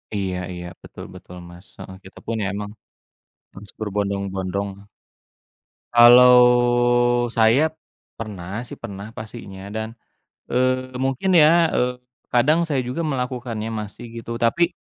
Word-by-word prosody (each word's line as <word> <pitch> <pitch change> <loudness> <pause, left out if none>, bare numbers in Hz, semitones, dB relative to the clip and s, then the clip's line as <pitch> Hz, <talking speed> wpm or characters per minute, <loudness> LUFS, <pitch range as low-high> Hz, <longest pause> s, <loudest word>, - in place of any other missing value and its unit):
Iya 95 -2 -2 0.2
iya, 90 0 -7 0.2
betul - - -11
betul, 90 - -12
Mas. 85 +2 -15
Heeh, 95 - -10
kita 95 - -15
pun 115 - -3
ya - - -1
emang 105 0 -5 0.8
harus 100 +1 -13
berbondong-bondong. 100 -1 -3 1.3
Kalau 125 +1 +8 0.9
saya 125 +8 +3 0.4
pernah 100 -1 -7
sih, 125 - -10
pernah 100 -2 -8
pastinya 105 -4 -10
dan, 110 +1 -5 0.5
eee, 130 +1 0
mungkin 135 +8 -1
ya, 165 0 +5
eee, 125 0 0 0.3
kadang 155 +8 +2
saya 135 -4 -1
juga 125 +6 -5
melakukannya, 125 -4 -4
masih 115 +2 -7
gitu. 115 0 -6
Tapi, 170 +10 +1
115 Hz, 120 wpm, -22 LUFS, 100-125 Hz, 1.3 s, Kalau